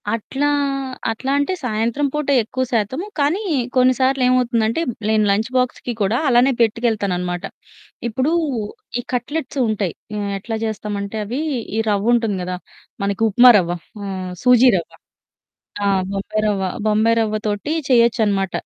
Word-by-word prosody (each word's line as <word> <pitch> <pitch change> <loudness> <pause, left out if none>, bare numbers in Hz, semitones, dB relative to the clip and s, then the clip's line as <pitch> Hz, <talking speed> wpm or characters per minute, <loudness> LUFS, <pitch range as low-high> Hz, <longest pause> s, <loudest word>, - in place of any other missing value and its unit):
అట్లా 270 +6 -2 0.6
అట్లా 260 +4 -3
అంటే 285 +6 0
సాయంత్రం 235 +4 0
పూట 300 -1 -2 0.2
ఎక్కువ 260 +4 -3
శాతము. 235 - -1
కానీ 295 +8 +1 0.3
కొన్నిసార్లేమవుతుందంటే 255 -1 +2 0.3
నేను 215 -1 +3
లంచ్ 215 +4 0
బాక్స్‌కి 250 -1 -1
కూడా 205 +4 +2
అలానే 250 +1 +4
పెట్టుకెళ్తాననమాట. 200 -6 0 0.6
ఇప్పుడు 260 +6 0 0.7
ఈ - - -2
కట్లెట్స్ 290 +5 -3
ఉంటాయి. 205 -5 -1 0.2
ఆహ్, 200 -1 -2
ఎట్లా 225 +3 -5
చేస్తామంటే 205 -1 -4
అవి 245 +8 -3 0.4
ఈ - - +2
రవ్వుంటుంది 215 0 +1
గదా! 180 0 -3 0.5
మనకి 200 +2 -2
ఉప్మా 245 +4 +8
రవ్వ 175 -3 0 0.3
ఆహ్, 185 -2 -5
సూజీ 250 0 +6
రవ్వ. 170 - -5 1.0
ఆ! - - +2 0.3
బొంబాయి 200 +2 -2
రవ్వ. 195 -2 0 0.2
బొంబాయి 220 +2 +3
రవ్వ 215 -1 -1
తోటి 210 +8 -2 0.2
చేయొచ్చనమాట. 220 -6 +3
225 Hz, 125 wpm, -20 LUFS, 205-255 Hz, 1.0 s, ఉప్మా